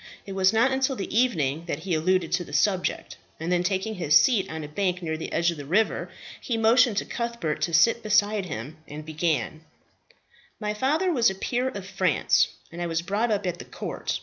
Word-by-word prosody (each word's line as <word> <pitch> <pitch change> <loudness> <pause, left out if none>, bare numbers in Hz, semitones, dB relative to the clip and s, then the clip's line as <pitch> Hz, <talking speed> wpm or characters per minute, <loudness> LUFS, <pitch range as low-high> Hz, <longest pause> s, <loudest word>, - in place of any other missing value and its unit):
It 200 - -8
was 190 -1 +3
not 230 +4 +3
until 265 0 0
the 200 -2 -5
evening 165 - +1
that 155 -2 -3
he 180 +1 -3
alluded 170 +2 +1
to 180 - +1
the - - -12
subject; 190 -3 0 0.2
and 165 +2 -3
then 175 -1 +2
taking 190 +4 -1
his 160 -6 +1
seat 230 -7 +3
on 160 0 -5
a - - -6
bank 180 +3 -2
near 160 -1 -2
the 160 - -6
edge 170 +1 +2
of 170 - -7
the 145 - -7
river, 210 +8 +1 0.3
he 235 - -2
motioned 225 0 +4
to - - 0
Cuthbert 235 -10 -3
to 170 - 0
sit 230 +8 +4
beside 210 -2 +2
him, 140 +3 -6
and 150 +1 -8
began, 155 -2 -2 1.0
"My 210 -1 -2
father 305 - +1
was 240 -7 +4
a 190 - -5
peer 245 +6 -1
of 200 -7 -7
France, 195 - +2 0.2
and 170 +1 -7
I 175 - -1
was 165 0 -1
brought 205 +6 0
up 205 -2 0
at 175 -1 -3
the - - -8
court. - - -4
190 Hz, 215 wpm, -25 LUFS, 165-225 Hz, 1.0 s, motioned